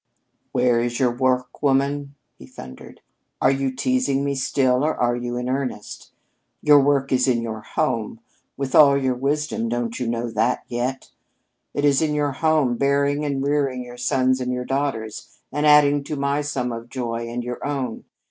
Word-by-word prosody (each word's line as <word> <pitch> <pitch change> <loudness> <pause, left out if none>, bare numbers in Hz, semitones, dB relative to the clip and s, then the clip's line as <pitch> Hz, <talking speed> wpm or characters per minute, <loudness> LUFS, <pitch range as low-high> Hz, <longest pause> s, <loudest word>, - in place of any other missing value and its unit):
"Where 125 -1 +2
is 120 0 -1
your 125 -2 +3
work, 125 -1 0
woman?" 140 0 0 0.2
he 65 - -12
thundered. 65 0 -12 0.4
"Are - - +4
you 135 -1 -1
teasing 255 - 0
me 140 - 0
still 130 -1 +1
or 155 +1 +1
are 120 0 +1
you 120 0 -4
in 125 0 -3
earnest? 130 -5 -4 0.5
Your 150 -1 +7
work 140 -1 +1
is 130 0 +2
in 120 -2 +1
your 110 -1 -5
home! 115 -4 -2 0.4
With 135 -1 -3
all 140 -2 +7
your 130 -2 0
wisdom, 140 -2 -1
don't 120 0 -2
you 125 - -2
know 115 0 -2
that 115 +3 0
yet? 125 +2 -3 0.6
It 145 - +1
is 140 0 +4
in 155 -2 0
your 145 -1 0
home, 145 -4 +1
bearing 140 +2 +1
and 140 -2 -1
rearing 140 -3 0
your 120 0 -11
sons 130 +1 +1
and 125 0 -2
your 125 0 -3
daughters, 135 -6 -3
and 150 +1 0
adding 145 -1 +5
to 150 - -4
my 140 +1 0
sum 135 -4 -2
of 115 +1 -7
joy 115 -2 -4
and 120 +1 -4
your 125 0 -6
own. 135 -5 -3
130 Hz, 180 wpm, -22 LUFS, 120-140 Hz, 0.6 s, Your